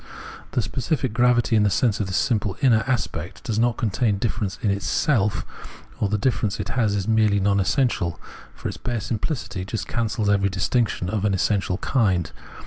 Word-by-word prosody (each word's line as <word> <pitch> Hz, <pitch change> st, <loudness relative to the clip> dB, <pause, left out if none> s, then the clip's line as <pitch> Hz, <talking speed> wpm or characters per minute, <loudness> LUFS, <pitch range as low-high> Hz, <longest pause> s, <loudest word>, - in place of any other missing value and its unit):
The -, -, +1 dB
specific 130 Hz, -3 st, -2 dB
gravity 120 Hz, 0 st, +3 dB
in 110 Hz, -, +4 dB
the 105 Hz, -, +3 dB
sense 110 Hz, +1 st, +1 dB
of 105 Hz, -, -1 dB
this 95 Hz, -, -1 dB
simple 105 Hz, -5 st, 0 dB
inner 115 Hz, -5 st, +4 dB
aspect 130 Hz, -3 st, -3 dB
does 110 Hz, -1 st, -1 dB
not 120 Hz, 0 st, +2 dB
contain 110 Hz, -2 st, 0 dB
difference 105 Hz, -3 st, -2 dB
in 105 Hz, -, +2 dB
itself, 100 Hz, -, +1 dB, 0.5 s
or 105 Hz, -, +1 dB
the 105 Hz, -, +1 dB
difference 110 Hz, -3 st, 0 dB
it 105 Hz, +2 st, -4 dB
has 115 Hz, -4 st, +1 dB
is 100 Hz, 0 st, -2 dB
merely 110 Hz, -2 st, +3 dB
non 100 Hz, 0 st, +2 dB
essential; 100 Hz, -, 0 dB, 0.4 s
for -, -, -5 dB
its -, -, -5 dB
bare 120 Hz, -1 st, -3 dB
simphcity 110 Hz, -, -3 dB
just 105 Hz, +3 st, -4 dB
cancels 110 Hz, -2 st, -1 dB
every 100 Hz, -1 st, +3 dB
distinction 95 Hz, 0 st, 0 dB
of 100 Hz, +1 st, -2 dB
an 100 Hz, -2 st, +2 dB
essential 95 Hz, -1 st, 0 dB
kind. 100 Hz, -8 st, +1 dB
105 Hz, 180 wpm, -23 LUFS, 100-120 Hz, 0.5 s, in